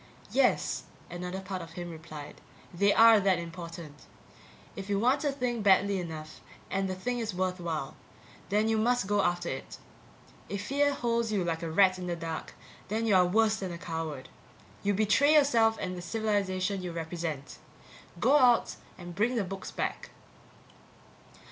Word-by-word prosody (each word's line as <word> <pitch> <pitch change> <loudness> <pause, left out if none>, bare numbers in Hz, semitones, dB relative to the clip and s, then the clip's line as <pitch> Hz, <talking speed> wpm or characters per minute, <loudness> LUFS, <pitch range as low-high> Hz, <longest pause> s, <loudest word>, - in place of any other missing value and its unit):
Yes, - - +1 0.3
another 180 +2 -5
part 190 -1 -5
of 165 - -10
him 175 0 -6
replied, 155 -2 -10 0.3
they 200 +4 +3
are 225 0 +7
that 195 -2 +3
important. 170 -3 -8 0.7
If 195 0 -7
you 200 - +1
want 255 +7 +2
a 290 - +1
thing 250 -4 -2
badly 200 0 +4
enough 155 -3 -7 0.3
and 195 0 0
the 185 - -2
thing 245 +6 -3
is 220 -5 -3
worthwhile, 175 -6 -2 0.5
then 210 +2 +2
you 225 -1 +2
must 245 0 +2
go 205 +1 +2
after 175 -2 0
it. 130 - -6 0.7
If 200 +1 -4
fear 285 +3 +2
holds 235 -4 -1
you 200 -4 +1
like 165 -1 -2
a 165 - -3
rat 185 +2 +4
in 180 - -5
the 175 - -1
dark, 165 -1 -6 0.3
then 220 +3 -1
you 220 - +3
are 180 -1 +5
worse 215 +3 +3
than 190 -3 -4
a 170 - -6
coward; 160 -5 -5 0.5
you 205 0 +1
betray 220 +9 +4
yourself 230 -7 +4
and 185 0 -3
the 175 - -6
civilization 200 -1 -1
you 180 -1 -4
represent. 165 -3 -5 0.6
Go 265 +10 +5
out 245 -3 +4 0.2
and 175 -1 -9
bring 225 +7 +1
the 225 - +1
books 190 +1 -6
back. - - -4
190 Hz, 165 wpm, -29 LUFS, 170-220 Hz, 0.7 s, are